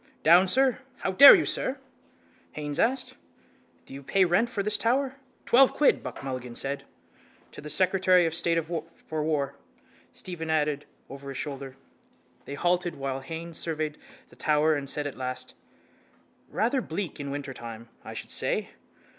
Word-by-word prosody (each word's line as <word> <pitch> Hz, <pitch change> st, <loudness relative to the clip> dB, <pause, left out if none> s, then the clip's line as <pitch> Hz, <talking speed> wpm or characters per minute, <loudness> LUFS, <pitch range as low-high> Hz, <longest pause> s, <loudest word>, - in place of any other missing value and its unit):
—Down, 175 Hz, +4 st, +6 dB
sir! 260 Hz, +5 st, +3 dB, 0.2 s
How 190 Hz, -, -2 dB
dare 280 Hz, +10 st, +11 dB
you, -, -, +1 dB
sir! 265 Hz, -, -1 dB, 0.8 s
Haines 145 Hz, -1 st, -4 dB
asked: 260 Hz, +3 st, 0 dB, 0.7 s
—Do -, -, -12 dB
you 140 Hz, -, -8 dB
pay 190 Hz, +7 st, +2 dB
rent 180 Hz, +7 st, +2 dB
for 205 Hz, -5 st, -2 dB
this 210 Hz, +1 st, 0 dB
tower? 260 Hz, +5 st, 0 dB, 0.3 s
—Twelve 260 Hz, +2 st, +5 dB
quid, 295 Hz, -, +3 dB
Buck -, -, -8 dB
Mulligan 130 Hz, -3 st, -5 dB
said. 140 Hz, +2 st, -4 dB, 0.7 s
—To -, -, -10 dB
the 150 Hz, -, -8 dB
secretary 185 Hz, +2 st, +3 dB
of 165 Hz, -, -1 dB
state 170 Hz, 0 st, +1 dB
for 160 Hz, -1 st, -5 dB
war, 150 Hz, -3 st, -1 dB, 0.6 s
Stephen 165 Hz, -3 st, -5 dB
added 150 Hz, -2 st, 0 dB, 0.2 s
over 140 Hz, +1 st, -9 dB
his 135 Hz, -, -6 dB
shoulder. 135 Hz, -2 st, -6 dB, 0.7 s
They 140 Hz, -, -6 dB
halted 175 Hz, +1 st, 0 dB
while 135 Hz, -1 st, -3 dB
Haines 165 Hz, +4 st, -6 dB
surveyed 155 Hz, -2 st, -3 dB, 0.3 s
the -, -, -18 dB
tower 155 Hz, +1 st, +2 dB
and 140 Hz, -2 st, -2 dB
said 150 Hz, +1 st, -1 dB
at 145 Hz, -, -5 dB
last: 130 Hz, 0 st, -5 dB, 1.0 s
—Rather 245 Hz, +4 st, 0 dB
bleak 170 Hz, -, -5 dB
in 140 Hz, -1 st, -5 dB
wintertime, 120 Hz, -5 st, -7 dB, 0.2 s
I -, -, -9 dB
should -, -, -7 dB
say. -, -, 0 dB
160 Hz, 155 wpm, -27 LUFS, 140-185 Hz, 1.0 s, dare